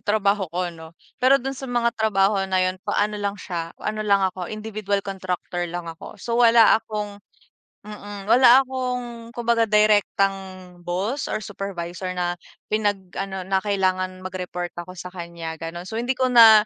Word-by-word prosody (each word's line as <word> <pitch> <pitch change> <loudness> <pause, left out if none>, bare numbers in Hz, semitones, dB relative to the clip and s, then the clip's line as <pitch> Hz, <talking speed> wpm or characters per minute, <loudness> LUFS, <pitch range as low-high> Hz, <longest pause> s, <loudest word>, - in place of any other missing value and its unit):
trabaho 205 -2 +1
ko 175 +1 -2
no, 160 0 -13 0.2
pero 260 +2 +6
dun 270 0 -3
sa 270 0 -7
mga 240 -1 +1
trabaho 200 -2 +3
na 185 -1 +2
yun 185 0 -2
ano 210 +1 +1
lang 200 0 -2
siya, 170 -4 -5
ano 215 0 -3
lang 200 -2 +3
ako, 180 -1 -6
individual 210 -2 -3
contractor 180 -2 -3
lang 175 0 -5
ako. 165 -1 -9
So 235 0 -1
wala 230 -2 +7
akong 210 -2 -5 0.7
mm, 205 -1 -8
wala 250 +4 +7
akong 250 -3 -4
kumbaga 230 -2 +2
direktang 195 -3 +1
boss 195 +11 -2
or - - 0
supervisor 190 -3 -5
na 175 0 0 0.4
pinag-ano 195 -2 -2
na 190 0 +1
kailangan 185 -2 -1
mag-report 180 -1 -4
ako 180 +1 -11
sa 180 +1 -8
kanya 170 -2 -6
ganun. 170 +2 -6
So 220 +4 -3
hindi 250 +2 -1
ko 255 -1 +1
na 220 -3 +9
200 Hz, 160 wpm, -23 LUFS, 185-220 Hz, 0.7 s, na